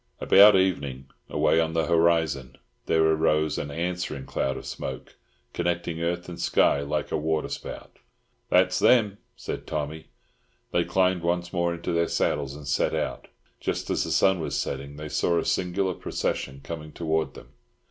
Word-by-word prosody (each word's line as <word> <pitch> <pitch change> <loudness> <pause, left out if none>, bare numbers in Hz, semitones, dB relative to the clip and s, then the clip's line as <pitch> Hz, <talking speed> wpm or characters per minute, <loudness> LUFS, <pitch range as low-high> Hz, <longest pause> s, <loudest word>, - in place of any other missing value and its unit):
About 100 +1 +7
evening, 70 -9 0 0.2
away 80 - +2
on 80 0 -1
the 80 -1 +1
horizon, 80 -6 +1 0.3
there 80 -1 +3
arose 80 -1 +2
an 75 - -4
answering 85 -3 -3
cloud 65 0 -2
of - - -9
smoke, 65 - -6 0.4
connecting 85 -1 -2
earth 85 +1 -2
and 85 -1 -7
sky, - - +3
like 70 - -2
a - - +1
waterspout. 80 0 -4 0.5
"That's 90 -1 +3
them," 105 -5 +4 0.2
said - - -6
Tommy. 75 +1 -4 0.6
They - - +1
climbed 95 -1 +2
once 85 +1 -1
more 85 -1 +1
into 85 - -4
their 85 0 +2
saddles, 70 -1 -1
and 75 -1 -10
set 70 - +1
out. 65 - -3 0.3
Just - - -3
as - - +1
the - - -5
sun 95 -2 +3
was 80 - -2
setting, 70 +1 -4
they 75 +1 -7
saw 85 +3 +1
a - - 0
singular 95 +1 0
procession 70 -4 -3
coming 80 -2 -7
towards 80 -1 -1
them. - - -12
80 Hz, 160 wpm, -26 LUFS, 75-90 Hz, 0.6 s, About